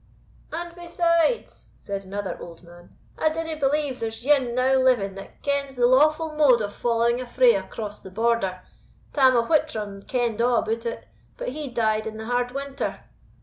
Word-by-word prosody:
"And 340 +1 -5
besides," 345 +3 0
said 195 -1 -6
another 200 +1 -4
old 170 0 -10
man, 175 0 -16 0.2
"I 315 - +3
dinna 325 0 -3
believe 285 -2 0
there's 225 +1 -5
ane 265 -5 +3
now 260 +1 +3
living 240 -7 +2
that 195 0 -12
kens 280 -1 -1
the 245 -1 +3
lawful 305 +5 +4
mode 280 -6 +5
of 205 -1 -3
following 235 +1 +1
a 255 - -7
fray 480 - +5
across 210 - -5
the 190 - -10
Border. 195 -3 0 0.5
Tam 260 -3 +5
o' 230 - +2
Whittram 220 -11 0
kend 235 -3 0
a' 240 - +4
about 230 -1 0
it; 230 - -6 0.3
but - - -3
he 300 -2 -5
died 220 -3 0
in 220 0 -6
the 220 - -6
hard 245 +1 0
winter." 275 +1 -4
245 Hz, 175 wpm, -24 LUFS, 220-295 Hz, 0.5 s, mode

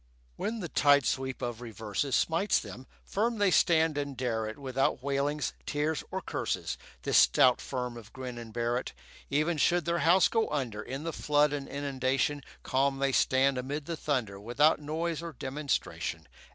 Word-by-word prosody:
When 225 - -3
the 175 - -3
tide 145 -3 +4
sweep 130 -1 -2
of 120 -1 -4
reverses 115 +3 -2
Smites 170 +5 +2
them, 130 +2 -7 0.2
firm 225 +3 0
they 205 -2 +3
stand 160 -4 +3
and 140 -2 -4
dare 115 -4 -1
it 110 - -6
Without 135 -1 -1
wailings, 140 +2 -1
tears, 150 +1 -1
or - - -3
curses, - - -2 0.3
This - - +4
stout 125 -1 +5
firm 125 -2 -4
of 110 -2 -12
Grin 125 -2 -7
and 115 -1 -9
Barrett. 120 +2 -2 0.4
Even 155 +4 +1
should 175 +2 +3
their 170 0 0
house 180 +3 +5
go 225 -1 0
under 120 -8 -2
In 135 +7 -6
the 165 0 -3
flood 150 0 +2
and 140 -2 -4
inundation, 140 0 -1 0.2
Calm 135 +1 +1
they 135 0 +1
stand 130 0 +3
amid 140 +3 -4
the 170 - -3
thunder 125 -11 -2
Without 130 +10 +3
noise 160 +2 -2
or 170 -1 -6
demonstration. 135 - -3
140 Hz, 170 wpm, -30 LUFS, 125-155 Hz, 0.4 s, stout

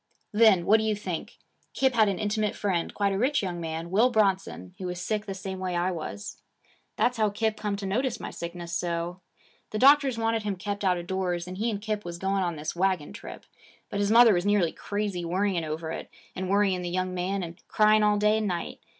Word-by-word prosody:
'Then 210 -5 +5
what 215 - +6
do 220 - -1
you 215 -1 +1
think 185 -5 -5 0.4
Kip 265 -1 +2
had 220 -3 +4
an 195 - -1
intimate 210 0 -1
friend, 185 -5 -1
quite 200 -1 0
a 195 - -1
rich 265 +1 +2
young 175 -2 -3
man, 165 +1 -4
Will 220 +6 +4
Bronson, 195 - 0
who 185 - -4
was 180 0 -4
sick 210 +3 -2
the 195 - -4
same 190 0 -6
way 185 -1 -2
I 175 +2 +1
was. 185 +4 -6 0.5
That's 250 0 +1
how 215 -1 +3
Kip 220 +1 -1
come 210 -2 -2
to 200 0 -5
notice 235 +6 -1
my - - -6
sickness 170 0 -6
so. 175 +1 -2 0.5
The 215 - -3
doctors 275 0 +5
wanted 225 0 0
him 205 -2 -2
kept 200 +2 -4
out 185 -2 +3
of 175 - -6
doors, 180 -2 -2
and 185 +1 -7
he 230 +2 +1
and 210 -3 -2
Kip 210 0 -3
was 175 -1 -6
going 195 +2 0
on 175 -2 -1
this 155 +2 -5
wagon 185 -2 0
trip. - - -10 0.5
But 200 - -2
his 205 0 +1
mother 230 0 +7
was 175 -1 +1
nearly 200 -5 +2
crazy 205 -3 -3
worrying 180 0 0
over 160 +1 -4
it, - - -6 0.3
and 185 0 -3
worrying 195 -2 +2
the 175 - -3
young 185 +1 -1
man 185 +2 -2
and 170 +1 -8
crying 215 0 +4
all 210 0 +3
day 210 +1 +3
and 215 - -1
night. 175 -3 -3
195 Hz, 225 wpm, -27 LUFS, 175-215 Hz, 0.5 s, mother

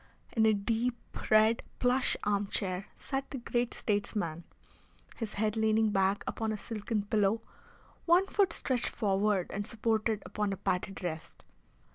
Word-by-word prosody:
In 220 -1 +4
a 220 - +5
deep 230 +4 0 0.3
red 215 +1 +5 0.2
plush 250 +1 +2
armchair 200 -2 0
sat 270 0 -4
the 275 - -5
great 240 0 -1
statesman, 200 -5 -1 0.7
his 225 -3 -4
head 215 +1 +1
leaning 220 0 +3
back 195 0 +2
upon 220 -1 -2
a 215 - -2
silken 215 0 -3
pillow, 210 +1 +1 0.6
one 350 +3 +6
foot 390 -2 +2
stretched 255 -6 0
forward 200 -3 +1
and 205 +1 -3
supported 220 -1 0
upon 205 +1 -1
a - - -5
padded 190 +1 -2
rest. 160 -2 -5
215 Hz, 140 wpm, -31 LUFS, 200-230 Hz, 0.7 s, one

